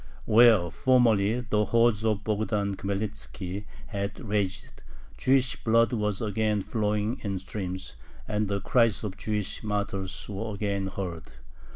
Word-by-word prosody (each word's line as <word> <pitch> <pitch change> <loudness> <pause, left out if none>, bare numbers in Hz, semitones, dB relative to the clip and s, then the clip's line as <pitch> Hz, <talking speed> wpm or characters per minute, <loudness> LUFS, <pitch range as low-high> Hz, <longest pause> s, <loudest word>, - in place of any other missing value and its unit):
Where 110 -6 +6
formerly 120 -3 +3
the 105 -4 +1
hordes 115 -2 +3
of 110 -2 0
Bogdan 105 -2 0
Khmelnitzki 100 -1 -4 0.2
had 100 -1 -4
raged, 100 -6 -3 0.3
Jewish 130 0 +2
blood 115 0 +3
was 105 -2 -1
again 105 -1 0
flowing 105 +2 -1
in 100 -2 -2
streams, 95 -1 -5 0.3
and 105 0 0
the 100 0 -1
cries 115 0 +2
of 100 -3 -4
Jewish 105 0 -3
martyrs 100 -3 -3
were 105 +1 -4
again 100 -1 -1
heard. 90 -4 -5
105 Hz, 130 wpm, -27 LUFS, 100-110 Hz, 0.3 s, Where